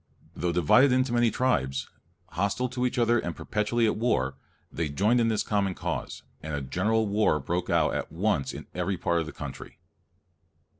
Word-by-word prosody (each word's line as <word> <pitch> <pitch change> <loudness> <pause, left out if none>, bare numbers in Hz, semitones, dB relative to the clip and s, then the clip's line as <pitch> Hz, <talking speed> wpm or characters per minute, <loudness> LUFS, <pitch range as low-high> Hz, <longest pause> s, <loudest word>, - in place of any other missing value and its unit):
Though 90 0 -1
divided 90 - +5
into 130 0 +2
many 120 -1 +4
tribes, 65 - 0 0.4
hostile 100 +7 -1
to 125 0 0
each 125 - -5
other 120 0 +3
and - - -4
perpetually 105 +2 0
at 110 - +1
war, 70 - 0 0.4
they 80 -2 -2
joined 105 +11 +2
in 115 - +2
this 110 -2 +1
common 100 -3 0
cause, - - -4 0.2
and 80 -1 -4
a 70 - -3
general 105 +11 +1
war 100 -6 +2
broke 85 +5 -2
out 85 -2 +2
at - - -3
once 70 - 0
in - - -8
every 90 +1 -1
part 85 0 +1
of 80 - -3
the - - -6
country. 70 -3 -8
100 Hz, 185 wpm, -27 LUFS, 80-120 Hz, 0.4 s, divided